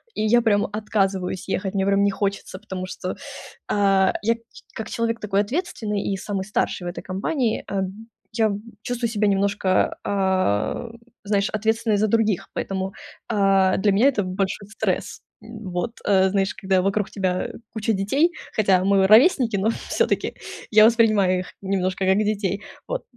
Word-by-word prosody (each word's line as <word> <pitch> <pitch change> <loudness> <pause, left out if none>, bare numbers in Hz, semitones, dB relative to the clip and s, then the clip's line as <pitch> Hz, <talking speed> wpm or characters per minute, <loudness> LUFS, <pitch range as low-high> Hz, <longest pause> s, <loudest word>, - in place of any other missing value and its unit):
И - - -2
я 240 +2 +4
прям 205 -3 +2
отказываюсь 195 -4 -1
ехать, 195 +1 -4
мне 195 0 +1
прям 200 0 +3
не 200 - +4
хочется, 195 -1 -3
потому 190 -3 -6
что, 185 0 -5 0.5
а, 195 -2 +3
я 230 +2 +3
как 230 - -19
ч - - -15
как 220 - -5
человек 230 0 -1
такой 200 -1 +1
ответственный, 215 - -2
и 195 - -2
самый 195 0 -3
старший 190 -3 -2
в - - -1
этой 175 - -7
компании, 220 +5 -1
э, 195 -1 -1
б 190 -1 -3 0.4
я 220 -1 +2
б 200 - -3 0.2
чувствую 245 -1 -2
себя 210 -2 +1
немножко, 200 -1 +1
а, 190 - 0 0.3
знаешь, 200 0 +1
ответственной 220 0 0
за 215 +2 +2
других. 210 -3 +1
Поэтому, 190 0 -3 0.4
а, 195 -3 +3
для 205 +2 +2
меня 210 +7 +4
это 245 -7 +1
большой 195 +2 -3
стресс. 220 - -2 0.2
Вот 215 -2 -5
знаешь, 195 0 +2
когда 190 -2 +1
вокруг 195 +2 0
тебя 185 -2 -1 0.2
куча 220 0 0
детей, 270 - +2 0.2
хотя 195 -4 +3
мы 195 0 +4
ровесники, 235 - +5
но 200 +3 +1 0.2
всё-таки, - - 0 0.4
я 215 -1 +7
воспринимаю 215 -5 +3
их 180 - -11
немножко 190 -1 -1
как 190 +1 +3
детей. 205 -1 -1 0.3
Вот, - - -3
200 Hz, 165 wpm, -23 LUFS, 190-220 Hz, 0.5 s, я